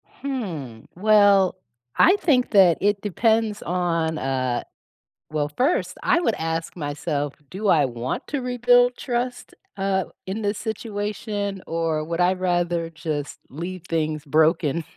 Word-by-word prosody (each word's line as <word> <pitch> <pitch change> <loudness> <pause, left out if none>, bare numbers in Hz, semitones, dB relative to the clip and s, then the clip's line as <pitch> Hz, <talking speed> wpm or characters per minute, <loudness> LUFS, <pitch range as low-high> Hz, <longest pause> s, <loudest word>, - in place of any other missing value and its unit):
Hmm. 170 - -5
Well, 200 -1 +5 0.4
I 370 - +6
think 270 -10 +2
that 190 -5 +6
it 205 0 +1
depends 220 +1 +1
on, 170 -3 0
uh 130 -3 -1 0.7
well 150 -1 -1
1st 280 +8 +1
I 345 - +3
would 230 -10 +1
ask 165 0 -3
myself, 145 -2 -3 0.2
"Do 205 +3 -3
I 155 -7 +5
want 120 0 -4
to 285 -2 -2
rebuild 245 0 +3
trust, 245 0 -3 0.2
uh, 195 -1 0 0.2
in 195 +4 -4
this 205 -1 -1
situation 205 -2 -4
or 165 -2 -1
would 165 +2 -2
I 180 +1 +4
rather 175 -2 0
just 155 -3 -5
leave 175 +5 -6
things 155 -2 -1
broken 160 +1 +2
180 Hz, 130 wpm, -23 LUFS, 160-215 Hz, 0.7 s, I